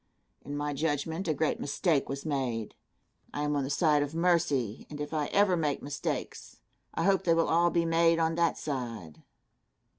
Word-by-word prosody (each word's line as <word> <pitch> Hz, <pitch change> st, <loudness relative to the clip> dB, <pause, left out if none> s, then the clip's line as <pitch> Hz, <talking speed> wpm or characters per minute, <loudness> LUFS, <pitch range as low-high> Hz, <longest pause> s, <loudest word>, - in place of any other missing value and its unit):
In 145 Hz, +1 st, -5 dB
my 145 Hz, 0 st, -2 dB
judgment, 160 Hz, +4 st, -2 dB
a 160 Hz, -, +2 dB
great 155 Hz, +2 st, 0 dB
mistake 145 Hz, 0 st, 0 dB
was 140 Hz, +2 st, -5 dB
made. 130 Hz, -7 st, -2 dB, 0.6 s
I 145 Hz, -, -1 dB
am 150 Hz, 0 st, 0 dB
on 140 Hz, -, 0 dB
the 135 Hz, -, -3 dB
side 150 Hz, 0 st, +3 dB
of 145 Hz, +2 st, -3 dB
mercy, 160 Hz, -, +1 dB
and 150 Hz, -, -8 dB
if 150 Hz, +1 st, -5 dB
I 150 Hz, -2 st, 0 dB
ever 200 Hz, -2 st, +3 dB
make 150 Hz, -4 st, -1 dB
mistakes, 145 Hz, 0 st, -4 dB, 0.4 s
I 165 Hz, -, 0 dB
hope 195 Hz, +1 st, +3 dB
they 165 Hz, -1 st, +3 dB
will 165 Hz, -, +2 dB
all 170 Hz, +1 st, +4 dB
be 170 Hz, -1 st, +1 dB
made 165 Hz, 0 st, +3 dB
on 165 Hz, 0 st, +1 dB
that 170 Hz, 0 st, +1 dB
side. 115 Hz, -, -5 dB
150 Hz, 185 wpm, -29 LUFS, 140-165 Hz, 0.6 s, all